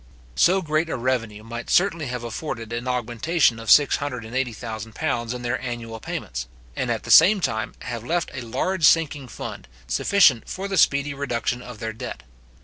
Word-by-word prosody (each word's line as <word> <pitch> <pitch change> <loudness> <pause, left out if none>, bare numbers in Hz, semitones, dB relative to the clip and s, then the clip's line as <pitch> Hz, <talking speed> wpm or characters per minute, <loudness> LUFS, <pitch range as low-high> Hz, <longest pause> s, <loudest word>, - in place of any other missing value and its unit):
So 185 - +3
great 155 +1 0
a - - -1
revenue 115 -4 -2
might 115 +1 -7
certainly 170 -5 +2
have 125 -1 -4
afforded 115 -1 -5
an 120 +2 -4
augmentation 125 +2 +1
of 115 - -6
£680,000 120 -4 0
in 125 - -6
their 120 +1 -1
annual 120 -3 -5
payments; - - -5 0.3
and, - - -2
at - - -1
the - - -3
same 195 +6 +8
time, 110 -10 -2
have 120 -2 -5
left 170 +6 -1
a - - -5
large 145 +10 -2
sinking 155 -4 +4
fund, - - -8 0.2
sufficient 140 - +3
for 195 +1 -4
the 195 - -2
speedy 140 0 +3
reduction 125 -3 -2
of 125 -2 -9
their 110 +1 -4
debt. 65 - -7
125 Hz, 165 wpm, -23 LUFS, 115-155 Hz, 0.3 s, same